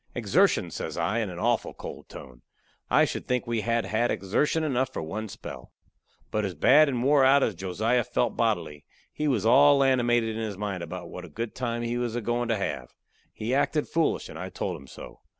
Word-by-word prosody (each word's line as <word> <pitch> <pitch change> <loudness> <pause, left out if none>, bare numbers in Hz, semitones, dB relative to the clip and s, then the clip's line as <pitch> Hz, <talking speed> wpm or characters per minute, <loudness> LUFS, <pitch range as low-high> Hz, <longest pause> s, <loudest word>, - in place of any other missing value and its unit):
"Exertion!" - - +2
says - - -5
I, 100 +8 0
in 110 -4 -2
a 90 - -7
awful 115 +5 0
cold - - -9
tone. - - -11 0.5
"I - - +5
should - - -5
think 125 -1 0
we 115 -2 -1
had 115 +1 0
had 115 +3 0
exertion 150 - 0
enough 130 -3 0
for - - -4
one 110 +7 -5
spell." 65 -8 -10 0.6
But 110 - 0
as 95 -3 -3
bad 145 - +5
and 125 -3 -1
wore 140 0 +4
out 135 +1 +5
as 110 - +1
Josiah 105 +7 0
felt - - -1
bodily, 75 -1 -1 0.3
he 150 - -2
was 120 -8 +1
all 140 +4 +6
animated 120 -4 +2
in 115 - -3
his 105 -3 -4
mind 100 -3 -3
about 85 +1 -7
what 90 - -7
a 90 - -10
good 115 +8 -5
time 120 -2 -3
he 120 +1 -2
was 120 -2 -2
a 120 - -1
goin' 120 +2 -1
to 115 -1 +1
have. 100 - -4 0.4
He 110 +4 -3
acted 145 +2 +1
foolish, 165 -1 0
and - - -9
I - - -5
told - - -4
him 70 - -12
so. - - -11
115 Hz, 215 wpm, -27 LUFS, 100-125 Hz, 0.6 s, all